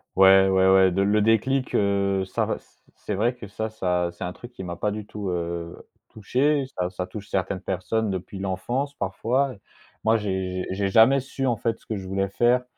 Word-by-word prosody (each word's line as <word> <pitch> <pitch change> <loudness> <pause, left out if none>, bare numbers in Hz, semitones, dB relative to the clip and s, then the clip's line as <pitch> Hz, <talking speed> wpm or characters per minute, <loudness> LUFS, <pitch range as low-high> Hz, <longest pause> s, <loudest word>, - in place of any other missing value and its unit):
Ouais, 95 0 +7
ouais, 95 0 +4
ouais, 95 -1 +6
de 95 - +1
le 105 +2 +3
déclic, 130 +5 +2
heu, 100 -1 +1
ça 95 - -1
res - - -2 0.4
c'est 105 - -4
vrai 115 +5 +1
que 120 -4 -10
ça 110 +2 -4
ça 90 -4 0
c'est 85 - -9
un 90 - -3
truc 120 +7 -11
qui 95 -6 -8
m'a 85 -1 -5
pas 105 +4 -1
du 105 0 -6
tout, 105 -3 -5
heu, 85 -1 -3 0.3
touché, 135 +7 +1
ça 90 0 -1
ça 90 0 -4
touche 100 +2 -9
certaines 95 -1 -1
personnes 100 +3 -1
depuis 95 +1 -5
l'enfance, 100 +9 -2
parfois. 125 +5 -1 0.5
Moi, 110 +1 +4
j'ai 95 -3 -2
j'ai 100 +1 -1
j'ai - - +1
jamais 115 +7 +6
su, 135 0 -3
en 120 -3 +1
fait, 115 0 -2
ce - - -26
que 110 - -3
je 95 -1 -7
voulais 95 +1 -1
faire, 120 +5 +2
100 Hz, 210 wpm, -25 LUFS, 95-115 Hz, 0.5 s, Ouais